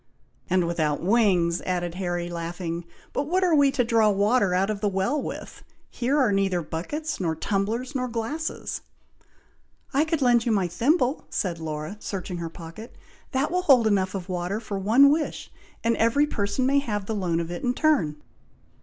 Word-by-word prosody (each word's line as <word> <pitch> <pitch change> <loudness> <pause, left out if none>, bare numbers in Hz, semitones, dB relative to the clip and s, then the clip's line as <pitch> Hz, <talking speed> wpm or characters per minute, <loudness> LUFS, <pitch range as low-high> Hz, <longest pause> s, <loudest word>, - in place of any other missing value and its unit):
"And 185 -1 +2
without 155 -3 0
wings," 185 -5 +3
added 175 -2 -2
Harry, 175 -1 -2
laughing; 170 0 -4 0.3
"but 280 - -1
what 370 +4 +1
are 355 -2 +3
we 285 -2 +5
to 250 - +2
draw 225 -2 +3
water 205 -1 +2
out 195 +3 +2
of 205 -2 -5
the 210 - +1
well 195 +10 0
with? - - -7 0.3
here 255 +4 0
are 255 -7 +3
neither 195 -3 +1
buckets, 295 - -4
nor 165 -4 0
tumblers, 220 - -2
nor 255 -2 -1
glasses!" 245 +8 -4 1.1
"I 280 +3 +4
could 320 -3 0
lend 240 -2 +4
you 235 - 0
my 195 -4 +2
thimble!" 255 - +1
said 175 -4 -2
Laura, 155 +4 -5
searching 185 -3 -5
her 170 -1 -4
pocket. 165 +7 -10 0.4
"That 270 +3 0
will 360 +1 +1
hold 270 -9 +5
enough 195 -3 +1
of 185 -2 -5
water 180 +2 -2
for 210 -3 -5
one 240 +9 +6
wish, 305 +1 -2 0.3
and 230 0 +2
every 230 +6 +3
person 205 -2 -1
may 280 +2 +4
have 210 -7 -3
the 220 - -3
loan 180 -5 0
of 170 0 -3
it 175 - -5
in 245 0 0
turn." 285 - +2
205 Hz, 180 wpm, -25 LUFS, 175-255 Hz, 1.1 s, one